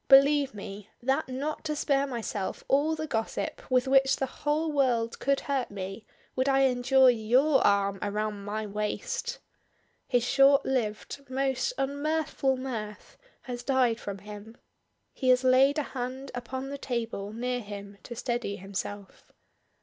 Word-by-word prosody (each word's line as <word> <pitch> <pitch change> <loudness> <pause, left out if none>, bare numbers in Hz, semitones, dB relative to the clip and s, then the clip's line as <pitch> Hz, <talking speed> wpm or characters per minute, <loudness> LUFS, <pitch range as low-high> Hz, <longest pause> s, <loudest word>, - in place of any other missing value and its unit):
Believe 275 -2 +6
me, 200 +1 -8
that 270 +3 +1
not 280 +4 -3
to 305 - -1
spare 280 -1 +1
myself 220 -6 -4
all 295 +4 +3
the 315 0 -4
gossip 225 -7 -3
with 255 0 +3
which 270 0 +5
the 270 - -1
whole 300 +4 -1
world 245 -5 +1
could 275 0 +1
hurt 275 -3 -1
me 195 +2 -7 0.3
would 260 +1 +1
I 270 0 +4
endure 260 0 +5
your 250 +5 +3
arm 200 -1 +2
around 210 0 -2
my 215 +2 -3
waist!" 340 - -3 0.7
His 245 -2 +2
short 275 +2 +5
lived, 245 +1 -2
most 270 - 0
unmirthful 285 -1 0
mirth 225 -5 -6 0.3
has 245 -1 -6
died 250 -4 +2
from 200 -1 -5
him, 210 +3 -10 0.6
he 260 - -1
has 255 0 +5
laid 265 +3 +5
a 300 - +1
hand 260 +1 -4
upon 260 +2 -5
the 280 0 -6
table 225 -6 -3
near 245 +3 -2
him 200 -2 -9
to 240 - -8
steady 235 -4 -2
himself. 200 +1 -7
255 Hz, 150 wpm, -28 LUFS, 215-275 Hz, 0.7 s, Believe